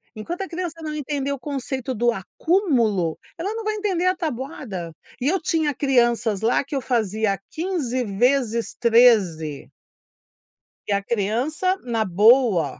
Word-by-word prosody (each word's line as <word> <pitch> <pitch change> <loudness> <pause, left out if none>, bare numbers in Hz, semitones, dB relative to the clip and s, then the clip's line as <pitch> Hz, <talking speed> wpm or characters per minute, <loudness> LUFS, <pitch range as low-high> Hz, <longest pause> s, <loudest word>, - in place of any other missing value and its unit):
enquanto 340 - -5
a - - -6
criança 345 -2 -5
não 305 -1 -4
entender 285 -2 -3
o 280 - -3
conceito 265 -2 -4
do 240 +2 +2
acúmulo, 230 - 0 0.2
ela 405 +6 -3
não 455 - -4
vai 430 0 -1
entender 390 -4 -1
a 370 - +3
tabuada. 260 - -5 0.3
E 250 - -1
eu 375 +4 +1
tinha 310 -2 0
crianças 240 -6 +1
lá 230 +5 +2
que 280 +1 -6
eu 270 - -1
fazia 220 -5 0
15 310 -8 -2
vezes 235 +2 0
13. 210 - +3 1.2
E 205 - +1
a 200 0 0
criança 245 - 0
na 230 -3 0
boa. 205 - +3
250 Hz, 145 wpm, -23 LUFS, 215-310 Hz, 1.2 s, a